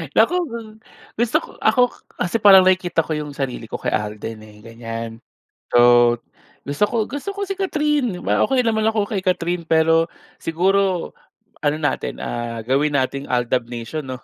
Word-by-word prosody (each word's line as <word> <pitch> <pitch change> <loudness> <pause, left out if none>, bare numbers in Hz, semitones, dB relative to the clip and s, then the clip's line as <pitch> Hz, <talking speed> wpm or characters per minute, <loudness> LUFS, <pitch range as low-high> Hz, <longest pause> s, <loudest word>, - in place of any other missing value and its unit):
Naku, 230 +11 +4 0.9
gusto 235 -1 +3
ko - - -11
ako 220 +3 +4 0.4
kasi 180 +6 0
parang 195 -2 +9
nakikita 180 -3 +2
ko 160 - -8
yung 150 -1 -4
sarili 125 -4 -4
ko - - -6
kay - - -2
Alden 105 +1 -3
eh, 105 - -16
ganyan. 115 0 -7 0.5
So, - - +4 0.9
gusto 145 +8 0
ko - - -5
gusto 285 +9 -5
ko 400 - -5
si 390 - -3
Kathryn 300 - 0
di - - -11
ba? - - +2
Okey 260 -2 +2
naman 220 -2 +1
ako 215 -2 +1
kay 205 -4 -2
Kathryn 175 -2 0
pero 165 +1 +3 0.3
siguro, 185 +2 +1 0.5
ano 150 0 +1
natin 145 -3 -2
ah 120 -1 -4
gawin 145 +3 +1
nating 135 +2 -2
AlDub 125 0 0
nation 120 +6 -5
'no? 130 -1 -5
165 Hz, 165 wpm, -21 LUFS, 125-210 Hz, 0.9 s, parang